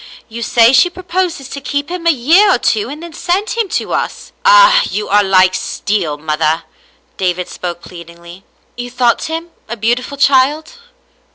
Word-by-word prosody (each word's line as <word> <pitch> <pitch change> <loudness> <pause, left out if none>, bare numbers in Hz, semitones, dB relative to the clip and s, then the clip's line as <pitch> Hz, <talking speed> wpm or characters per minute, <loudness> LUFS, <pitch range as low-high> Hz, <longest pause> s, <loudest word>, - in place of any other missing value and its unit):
You 230 0 -8
say 230 +1 +4
she 355 +7 +5
proposes 355 -5 -3
to 280 - -7
keep 285 +2 -3
him 350 -1 -4
a - - +6
year 335 - +4
or - - 0
two 220 -1 -1
and 300 +4 -8
then 340 -1 -10
send 370 +7 -2
him 460 -4 -2
to - - -3
us." - - -4
*' 485 - -41
Ah, - - +6
you 210 0 -3
are 205 +1 +4
like 185 -1 +3
steel, 185 -7 -2
mother." 155 +1 -1 0.5
David 180 -1 -2
spoke 175 -1 -6
plead 170 -2 -12
ingly, 170 +2 -14 0.2
*' - - -40
You 245 0 -6
thought 245 -1 0
him 325 +2 -5 0.2
a 235 - -5
beautiful 245 +5 -2
child 285 - +1
250 Hz, 185 wpm, -14 LUFS, -, 0.5 s, a